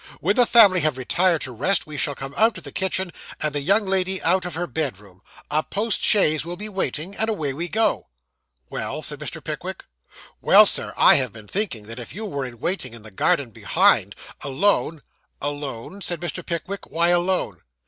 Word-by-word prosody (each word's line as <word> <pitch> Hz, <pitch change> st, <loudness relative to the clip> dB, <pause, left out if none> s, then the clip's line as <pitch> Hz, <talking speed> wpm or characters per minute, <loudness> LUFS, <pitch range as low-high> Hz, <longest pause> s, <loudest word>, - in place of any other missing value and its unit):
When 200 Hz, +5 st, +1 dB
the 245 Hz, -1 st, +5 dB
family 205 Hz, -6 st, +7 dB
have 155 Hz, -4 st, 0 dB
retired 170 Hz, +6 st, +1 dB
to 130 Hz, -, -5 dB
rest, 150 Hz, -, 0 dB
we 150 Hz, -, -9 dB
shall 145 Hz, 0 st, -2 dB
come 135 Hz, +1 st, -7 dB
out 225 Hz, +1 st, +3 dB
of -, -, -9 dB
the -, -, -9 dB
kitchen, 190 Hz, -1 st, -2 dB, 0.3 s
and 150 Hz, -1 st, -1 dB
the 145 Hz, -, -1 dB
young 200 Hz, +8 st, +2 dB
lady 190 Hz, 0 st, +1 dB
out 185 Hz, +2 st, +2 dB
of 175 Hz, -3 st, -5 dB
her 175 Hz, +2 st, -2 dB
bedroom. 105 Hz, -, -5 dB, 0.3 s
A 155 Hz, +1 st, +3 dB
post 210 Hz, +5 st, -2 dB
chaise 155 Hz, -8 st, +3 dB
will 175 Hz, +2 st, -7 dB
be 210 Hz, +3 st, -6 dB
waiting, 190 Hz, -2 st, -3 dB
and 220 Hz, -, +1 dB
away 155 Hz, -10 st, -2 dB
we 170 Hz, +5 st, -4 dB
go.' 220 Hz, +5 st, 0 dB, 0.6 s
'Well?' -, -, -5 dB
said -, -, -4 dB
Mr. -, -, -7 dB
Pickwick. -, -, -6 dB, 0.6 s
'Well, -, -, +7 dB
sir, -, -, +3 dB
I -, -, +7 dB
have 130 Hz, -4 st, 0 dB
been 110 Hz, -2 st, -12 dB
thinking 180 Hz, -, -3 dB
that 115 Hz, +3 st, -8 dB
if 120 Hz, -, -8 dB
you 220 Hz, +2 st, -5 dB
were 140 Hz, -9 st, -3 dB
in 120 Hz, -2 st, -9 dB
waiting 130 Hz, -, -3 dB
in 115 Hz, -, -11 dB
the 110 Hz, -, -12 dB
garden 120 Hz, +5 st, 0 dB
behind, -, -, +3 dB, 0.3 s
alone 155 Hz, +1 st, 0 dB, 0.2 s
' -, -, -46 dB
'Alone,' 145 Hz, -, -5 dB
said 175 Hz, -2 st, -2 dB
Mr. 175 Hz, +1 st, -5 dB
Pickwick. 180 Hz, +4 st, -5 dB
'Why 170 Hz, +1 st, +1 dB
alone? 175 Hz, -, +1 dB
170 Hz, 200 wpm, -23 LUFS, 135-190 Hz, 0.6 s, family